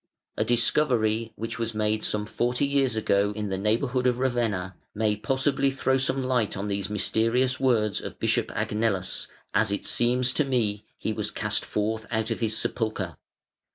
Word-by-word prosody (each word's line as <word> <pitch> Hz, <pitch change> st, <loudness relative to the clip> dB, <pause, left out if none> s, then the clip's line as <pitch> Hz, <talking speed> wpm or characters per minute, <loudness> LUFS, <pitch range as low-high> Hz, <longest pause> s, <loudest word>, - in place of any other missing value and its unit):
] -, -, -66 dB
A -, -, +1 dB
discovery, 115 Hz, -3 st, +2 dB
which 115 Hz, +1 st, -5 dB
was 115 Hz, -1 st, -2 dB
made 110 Hz, 0 st, 0 dB
some 105 Hz, 0 st, 0 dB
forty 125 Hz, +5 st, 0 dB
years 140 Hz, -4 st, +1 dB
ago 105 Hz, -1 st, +2 dB
in 105 Hz, -1 st, -3 dB
the 95 Hz, -, -1 dB
neighbourhood 120 Hz, +5 st, +1 dB
of 125 Hz, -1 st, +2 dB
Ravenna, 115 Hz, -8 st, -1 dB, 0.2 s
may 105 Hz, 0 st, +1 dB
possibly 135 Hz, +4 st, +1 dB
throw 135 Hz, 0 st, +1 dB
some 135 Hz, 0 st, 0 dB
light 125 Hz, -6 st, 0 dB
on 100 Hz, +2 st, -3 dB
these 100 Hz, -1 st, -2 dB
mysterious 115 Hz, +5 st, +1 dB
words 115 Hz, -6 st, +2 dB
of -, -, -7 dB
Bishop -, -, +1 dB
Agnellus: 105 Hz, -4 st, 0 dB, 0.3 s
"As 110 Hz, -2 st, +2 dB
it 100 Hz, -, -2 dB
seems 125 Hz, +1 st, +3 dB
to 150 Hz, -, +2 dB
me, 110 Hz, -7 st, -1 dB
he -, -, -2 dB
was -, -, -2 dB
cast -, -, -1 dB
forth 110 Hz, +1 st, -2 dB
out 110 Hz, 0 st, -1 dB
of 115 Hz, -, -2 dB
his 110 Hz, -2 st, 0 dB
sepulchre". 110 Hz, -7 st, -2 dB
110 Hz, 175 wpm, -26 LUFS, 105-125 Hz, 0.3 s, seems